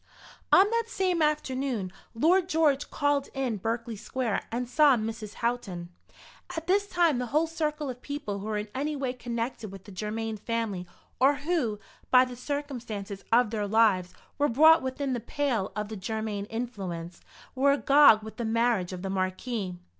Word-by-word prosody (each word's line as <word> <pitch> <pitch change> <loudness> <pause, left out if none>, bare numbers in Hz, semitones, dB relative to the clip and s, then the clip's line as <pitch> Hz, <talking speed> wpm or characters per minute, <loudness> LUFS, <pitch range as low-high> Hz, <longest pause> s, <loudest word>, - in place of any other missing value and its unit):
On 385 +2 +7
that 465 0 +1
same 370 -5 0
afternoon 265 -9 -1 0.2
Lord 350 +8 +3
George 300 -4 +2
called 285 -1 0
in 260 -5 -1
Berkeley 230 +3 -3
Square 230 +1 -3
and 245 +2 -2
saw 280 +1 +5
Mrs. 220 -1 -5
Houghton. 195 -8 -2 0.7
At 325 - -4
this 400 +3 +2
time 340 -8 +2
the 250 - -2
whole 305 +7 +2
circle 305 -2 -2
of 250 -1 -6
people 280 -9 -4
who 200 - -6
were 215 -1 -1
in 210 +1 -3
any 295 +3 -2
way 265 -3 -2
connected 235 -3 -4
with 195 -1 -10
the 205 - -12
Germain 215 +3 -3
family, 210 -5 -3 0.3
or 270 +3 +5
who, 285 -9 -1 0.3
by 255 0 +7
the 250 -1 -8
circumstances 240 -8 -5
of 235 -1 +4
their 210 -2 -1
lives 200 -4 +3 0.2
were 290 - +3
brought 315 +7 +6
within 260 +1 -2
the 245 - -1
pale 235 -5 -1
of 210 -1 -2
the 220 - -5
Germain 215 0 -3
influence, 190 -8 -5 0.3
were 280 +2 +4
agog 280 -6 +6
with 220 - -9
the 240 - -3
marriage 225 -5 +1
of 180 0 -7
the 195 - -3
Marquis. 185 +1 -2
240 Hz, 170 wpm, -28 LUFS, 210-285 Hz, 0.7 s, On